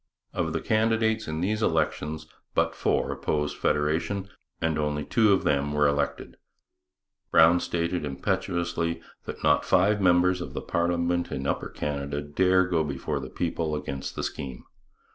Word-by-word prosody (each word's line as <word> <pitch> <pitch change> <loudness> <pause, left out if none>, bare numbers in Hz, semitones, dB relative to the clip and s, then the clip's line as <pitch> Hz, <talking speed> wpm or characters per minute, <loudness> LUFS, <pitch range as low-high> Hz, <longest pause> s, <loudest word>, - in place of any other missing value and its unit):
Of - - -1
the - - -1
candidates 110 0 +1
in 80 +1 -3
these 105 +4 0
elections 80 -3 0 0.3
but - - +2
four - - 0
opposed 75 -1 -1
federation 80 +7 0 0.3
and 80 -1 0
only 75 0 -1
two 110 -2 +3
of 95 - +3
them 70 0 +1
were 75 0 +4
elected. 70 0 -2 0.9
Brown 85 +2 +6
stated 85 0 -1
impetuously 85 +3 -1 0.3
that - - -7
not 75 -1 +4
five 100 +3 +3
members 90 0 +4
of - - -7
parliament 85 0 0
in 65 - -3
Upper - - -1
Canada 70 0 -3
dare 95 +5 +3
go 85 -3 +1
before 70 -3 -3
the - - -7
people 80 -2 -2
against 70 -2 -5
the - - -3
scheme. 65 -3 -5
85 Hz, 145 wpm, -27 LUFS, 75-90 Hz, 0.9 s, Brown